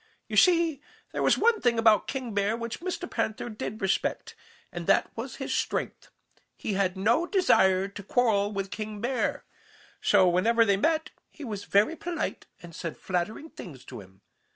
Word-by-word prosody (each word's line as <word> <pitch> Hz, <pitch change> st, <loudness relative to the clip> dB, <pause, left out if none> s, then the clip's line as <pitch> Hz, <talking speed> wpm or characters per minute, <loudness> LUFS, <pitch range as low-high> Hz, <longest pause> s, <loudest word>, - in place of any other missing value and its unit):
You -, -, -5 dB
see, 335 Hz, -5 st, +4 dB, 0.3 s
there -, -, -3 dB
was -, -, +4 dB
one 460 Hz, 0 st, +3 dB
thing 240 Hz, -2 st, +2 dB
about 220 Hz, -2 st, +4 dB
King 255 Hz, -5 st, -4 dB
Bear 205 Hz, +2 st, 0 dB
which 235 Hz, -1 st, -5 dB
Mr. 360 Hz, 0 st, -4 dB
Panther 220 Hz, -4 st, -3 dB
did 215 Hz, -1 st, -6 dB
respect, 195 Hz, -, -1 dB, 0.4 s
and -, -, -6 dB
that -, -, +3 dB
was -, -, -6 dB
his -, -, -4 dB
strength. -, -, -2 dB, 0.5 s
He 210 Hz, -, -3 dB
had 190 Hz, -1 st, 0 dB
no 230 Hz, -, +2 dB
desire 190 Hz, -, +3 dB
to 200 Hz, -, -9 dB
quarrel 205 Hz, -1 st, +1 dB
with 195 Hz, -1 st, -4 dB
King 215 Hz, 0 st, -5 dB
Bear. 245 Hz, +4 st, -1 dB, 0.6 s
So 190 Hz, -3 st, +4 dB
whenever 225 Hz, +7 st, +3 dB
they 200 Hz, -2 st, +3 dB
met 315 Hz, +9 st, 0 dB, 0.2 s
he 305 Hz, -, -12 dB
was 210 Hz, -5 st, -5 dB
very 210 Hz, +11 st, +3 dB
polite 335 Hz, 0 st, -4 dB, 0.2 s
and 170 Hz, -1 st, -11 dB
said 165 Hz, 0 st, -6 dB
flattering 190 Hz, -, -3 dB
things 140 Hz, -8 st, -11 dB
to 125 Hz, -4 st, -9 dB
him. 95 Hz, 0 st, -18 dB
215 Hz, 175 wpm, -27 LUFS, 195-265 Hz, 0.6 s, see